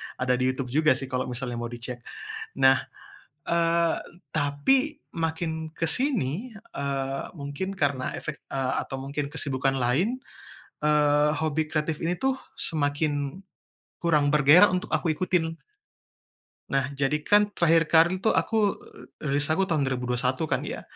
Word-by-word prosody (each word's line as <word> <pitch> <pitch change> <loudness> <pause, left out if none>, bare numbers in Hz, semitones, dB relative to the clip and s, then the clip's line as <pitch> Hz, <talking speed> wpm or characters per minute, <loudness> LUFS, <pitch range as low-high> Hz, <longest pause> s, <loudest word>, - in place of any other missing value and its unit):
Ada 125 0 0
di 130 - +2
Youtube 130 -1 -5
juga 155 -2 +4
sih 135 - -2
kalo 130 0 -1
misalnya 125 -1 -4
mau 120 - -3
dicek. 120 +1 -6 0.6
Nah, 130 0 +7 0.7
eee, 170 0 +2 0.4
tapi 155 - +1 0.2
makin 160 -1 -2
ke 165 - -1
sini, 215 - 0 0.2
eee, 135 -1 -2
mungkin 145 +7 -4
karena 140 -4 0
efek, 150 - -6
eee, 135 -1 -1
atau 135 - -6
mungkin 140 +1 -4
kesibukan 135 -3 0
lain, 160 - +1 0.6
eee, 150 0 +4
hobi 155 0 0
kreatif 155 0 -1
ini 170 +2 0
tuh, 265 +3 0 0.2
semakin 145 +2 0 0.6
kurang 150 -4 +3
bergairah 150 +7 +7
untuk 185 - -1
aku 165 - +1
ikutin. 165 -1 -1 1.1
Nah 135 -1 0
jadi 140 +2 0
kan 205 +2 +4
terakhir 165 -1 +4
kari 170 +3 +4
tuh 220 +4 +1
aku, 215 -3 +2
eee, - - -15 0.3
rilis 145 +1 +2
aku 190 +4 +2
tahun 150 -5 +2
2021 125 +1 -1
kan - - 0
ya. - - -5
150 Hz, 140 wpm, -26 LUFS, 135-170 Hz, 1.1 s, Nah